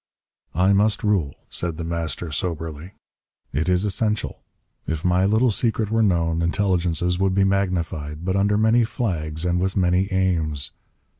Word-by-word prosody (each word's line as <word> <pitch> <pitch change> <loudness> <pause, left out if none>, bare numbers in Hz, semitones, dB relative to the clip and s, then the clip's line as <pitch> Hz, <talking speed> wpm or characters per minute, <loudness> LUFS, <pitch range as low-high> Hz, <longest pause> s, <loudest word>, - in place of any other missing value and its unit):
"I 95 +2 +4
must 105 +2 +2
rule," 95 -10 +1 0.2
said 85 -2 -2
The 85 - -4
Master 85 0 -3
soberly. 80 +2 -4 0.6
"It 80 +6 0
is 90 +2 +2
essential. 105 +1 -2 0.5
If 80 +1 -3
my 90 +1 +3
little 110 +4 +3
secret 110 -1 -1
were 115 0 +2
known, 85 -5 +1
intelligences 90 -1 0
would 95 -1 +1
be 100 - +4
magnified, 85 -5 -1
but 95 0 0
under 100 +1 +2
many 110 +2 +4
flags 85 - -2
and 90 0 +1
with 95 +2 -1
many 90 +1 +2
aims. 80 -7 0
90 Hz, 150 wpm, -23 LUFS, 80-100 Hz, 0.6 s, I